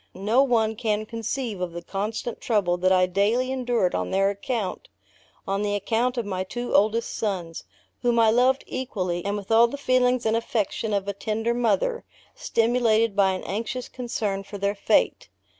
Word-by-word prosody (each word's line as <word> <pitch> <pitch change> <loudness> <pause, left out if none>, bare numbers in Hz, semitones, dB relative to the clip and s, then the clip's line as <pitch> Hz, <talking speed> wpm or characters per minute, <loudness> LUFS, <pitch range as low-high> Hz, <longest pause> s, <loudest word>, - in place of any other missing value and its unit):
No 210 +7 +2
one 225 -5 +2
can 215 -1 -1
conceive 230 -2 -4
of 180 -2 -3
the 170 0 -7
constant 215 +5 -4
trouble 200 -6 +1
that 185 +1 +2
I 185 -1 +5
daily 210 +8 +1
endured 245 -8 0
on 90 0 -1
their 195 +1 +2
account 200 0 -4 0.6
on 195 +1 0
the 205 0 0
account 235 +5 0
of 235 - -1
my 185 -2 -2
two 240 +6 -5
oldest 220 +3 +2
sons, 180 -6 -3 0.4
whom 240 -1 +2
I 225 -1 +5
loved 255 +3 +3
equally, 185 -9 -3
and 200 +1 -1
with 200 +1 -7
all 230 +1 +6
the 285 - -6
feelings 255 -2 +2
and 220 0 +2
affection 225 -1 -1
of 200 -1 -1
a 200 - -1
tender 220 +3 -1
mother, 465 - 0 0.3
stimulated 230 -2 +1
by 195 -2 +3
an 185 - -5
anxious 230 +5 -4
concern 220 -6 -3
for 200 +1 -9
their 200 +1 0
fate. 200 - +1
220 Hz, 175 wpm, -25 LUFS, 195-240 Hz, 0.6 s, all